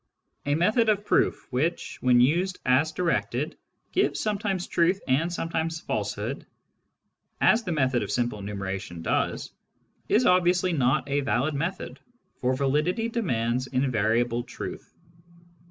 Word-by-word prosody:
A 145 - +2
method 215 +8 +3
of 205 -1 +1
proof - - +1
which, 155 +7 -2
when 125 -1 +4
used 175 +9 +2
as 135 +5 +3
directed, 170 +1 -1 0.4
gives - - +1
sometimes 200 -3 -1
truth 175 +3 +2
and 150 +7 +1
sometimes 165 -1 -2
falsehood - - -3 0.5
— - - -50
^as 225 +2 +5
the 180 - -2
method 130 -5 +1
of - - -4
simple 120 -3 -1
enumeration 95 -4 -5
does - - -1 0.3
— - - -41
is 240 +3 +3
obviously 180 0 +3
not 135 -1 +1
a 140 0 +1
valid 135 +2 0
method, 165 +7 -4 0.4
for 130 +1 +1
validity 150 - 0
demands 125 - -1
invariable 120 -2 +1
truth. 120 - -8
150 Hz, 135 wpm, -26 LUFS, 125-180 Hz, 0.5 s, ^as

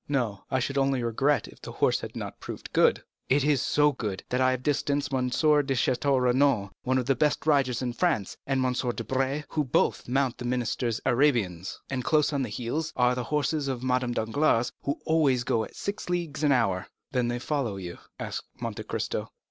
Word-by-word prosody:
"No; 120 -8 -1
I 130 - +1
should 135 +2 0
only 135 -2 +1
regret 135 +5 +1
if - - -15
the - - -8
horse - - +2
had - - -8
not - - -6
proved - - -8
good." - - +4 0.3
"It 135 +1 +3
is 145 -3 +3
so 150 0 +3
good, 105 -8 -4
that 125 +1 0
I 130 - +5
have 130 -1 -1
distanced 145 -1 0
M. 130 -1 +1
de 125 - -2 0.4
Château 130 +2 +2
Renaud, 125 -5 +2
one 130 +1 +1
of 125 - 0
the 135 - +3
best 150 +5 +1
riders 135 -5 +2
in 125 -1 -2
France, 120 - 0
and 135 -1 +1
M. 125 - +1
Debray, 130 +3 -1
who 155 - 0
both 130 - +1
mount 130 0 0
the 125 - -5
minister's 120 -1 -1
Arabians; 115 - +1
and 130 -2 -3
close 150 +1 +2
on 140 - 0
their 125 - -2
heels 125 +9 -3
are 125 0 +3
the 125 -1 -3
horses 150 0 0
of 130 -2 -3
Madame 125 -1 +1
Danglars, 120 +1 +1
who 140 - -2
always 145 -6 +3
go 115 -1 +1
at - - -10
six 200 -2 -4
leagues 170 -4 -2
an 145 - +4
hour." 100 -8 +1 0.2
"Then 125 -2 +1
they 120 0 -1
follow 125 -4 -2
you?" 90 -3 -7 0.2
asked - - -4
Monte - - -4
Cristo. - - -3
130 Hz, 205 wpm, -27 LUFS, 120-140 Hz, 0.4 s, I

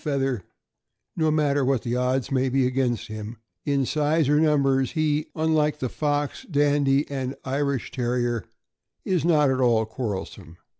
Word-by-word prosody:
feather," 135 -6 -1 0.7
no 160 -1 +1
matter 145 -2 +2
what 130 -2 +1
the 120 0 -2
odds 125 +1 0
may 130 0 +1
be 130 0 +2
against 125 -2 0
him, 110 +2 -7 0.3
in 140 -2 +1
size 150 +2 +1
or 150 +1 +3
numbers, 135 -4 +2
he, 155 -2 0
unlike 155 -1 +1
the 130 -3 -3
Fox, 145 0 -2
Dandie, 145 -2 +2
and 135 -2 -4
Irish 140 -1 -1
Terrier, 120 -3 -1 0.6
is 185 -4 +1
not 150 -5 +4
at 130 0 0
all 115 -3 +3
quarrelsome. 100 -6 -6
135 Hz, 150 wpm, -25 LUFS, 125-150 Hz, 0.7 s, not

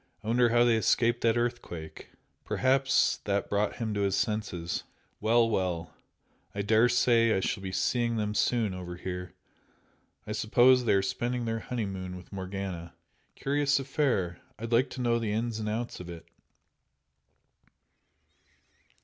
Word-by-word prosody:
I - - -9
wonder 120 +1 +4
how 120 +1 +4
they 120 -2 +4
escaped 120 +2 +2
that 115 0 +3
earthquake? 120 -10 -4 0.3
Perhaps 135 +1 +2
that 100 -1 -1
brought 105 +1 +1
him 110 -2 -3
to 100 - -2
his 100 -1 +1
senses! 95 -6 -2 0.4
Well, 115 +2 +3
well! 90 -7 -2 0.6
I 100 - -1
daresay 115 +1 +4
I - - +1
shall 95 - -2
be 95 -1 -5
seeing 120 +4 0
them 105 -1 -1
soon 110 -2 +1
over 90 -1 -6
here 90 0 -6 0.9
I - - -6
suppose 120 +4 +4
they - - +3
are 95 -1 +3
spending 120 +5 -2
their 115 0 -1
honeymoon 95 -6 -4
with 90 - -13
Morgana. 95 -3 -5 0.4
Curious 145 0 +1
affair! 125 - -1 0.2
I'd 115 +2 -6
like 120 +3 +3
to 130 - -6
know 120 -1 +2
the 110 -3 -2
ins 115 0 -2
and 105 -1 -2
outs 115 +3 -3
of 90 -1 -8
it!" 85 -1 -9
110 Hz, 150 wpm, -29 LUFS, 95-120 Hz, 0.9 s, wonder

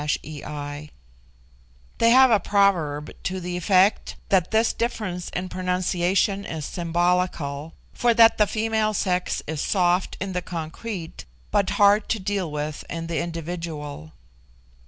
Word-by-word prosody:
They 145 0 -7 1.2
have 260 +1 +7
a 215 - +5
proverb 175 -9 +1
to 185 +1 -3
the 180 0 -4
effect 185 +3 +2
that 185 -3 +3
this 220 +1 +2
difference 210 -7 -3
in 180 +1 -4
pronunciation 185 +2 0
is 160 -6 -5
symbolical, 170 -4 -1 0.2
for 240 -1 +2
that 225 -1 +6
the 210 - +5
female 220 0 0
sex 180 -2 -1
is 155 -1 -3
soft 180 -1 +1
in 195 -1 -4
the 180 - -1
concrete, 170 +2 -6 0.3
but 200 -2 +2
hard 205 0 +4
to 225 - 0
deal 195 -3 -2
with 150 0 -4
in 165 0 -4
the 165 -1 -2
individual. 165 - -5
180 Hz, 130 wpm, -24 LUFS, 160-200 Hz, 1.2 s, have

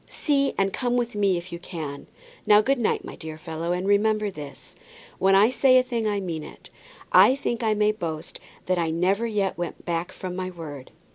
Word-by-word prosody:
See 280 -2 0
and 195 0 +1
come 245 -1 0
with 240 0 -1
me 200 -3 +2
if 175 +1 -8
you 170 - -5
can. 155 -5 -7 0.4
Now, 210 0 +7
good 270 +3 +1
night, 230 - 0
my - - -8
dear 160 -1 -8
fellow, 160 +2 -4
and 180 +2 -1
remember 210 0 +2
this, 145 -5 -10 0.4
when 195 0 +4
I 210 +5 +5
say 255 0 +5
a 255 - +5
thing 235 -3 -2
I 205 -1 0
mean 170 -5 -4
it. - - -13 0.4
I 260 - +7
think 240 -4 -3
I 220 -2 +1
may 210 0 +3
boast 165 -6 -6 0.3
that 185 -1 +1
I 165 -1 0
never 190 +7 +1
yet 200 -5 -1
went 175 - -5
back 170 +1 -2
from 185 -1 -6
my 185 0 -3
word." 150 -7 -9
195 Hz, 210 wpm, -25 LUFS, 170-220 Hz, 0.4 s, Now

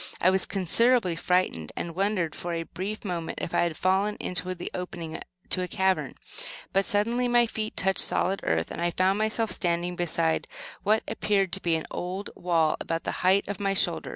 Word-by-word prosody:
I 185 - +5
was 190 -1 +1
considerably 200 +1 +2
frightened, 165 - +1
and 170 - -4
wondered, 185 -3 0
for 175 0 -4
a 165 - -2
brief 200 +6 -5
moment, 170 -4 -3
if - - -4
I - - +3
had 170 -2 0
fallen 195 +3 +1
into 180 +1 -1
the 175 - -6
opening 175 -3 -5 0.3
to 185 - +1
a 180 - -1
cavern; 190 +1 0 0.6
but 195 0 +3
suddenly 235 +4 +1
my 240 0 +5
feet 220 -1 -4
touched 190 0 +2
solid 195 +1 +1
earth, 80 0 0
and - - -5
I 175 - +2
found 185 +3 +2
myself 220 +1 +1
standing 175 0 -1
beside 165 -2 0 0.3
what 215 +2 +2
appeared 200 -3 +1
to 195 - -4
be 170 -1 +2
an 160 - -3
old 185 +3 -4
wall 165 -3 +2
about 165 0 -2
the - - -2
height 190 +2 +4
of 205 -1 -4
my 195 -1 0
shoulder. - - +1
185 Hz, 195 wpm, -27 LUFS, 170-205 Hz, 0.6 s, I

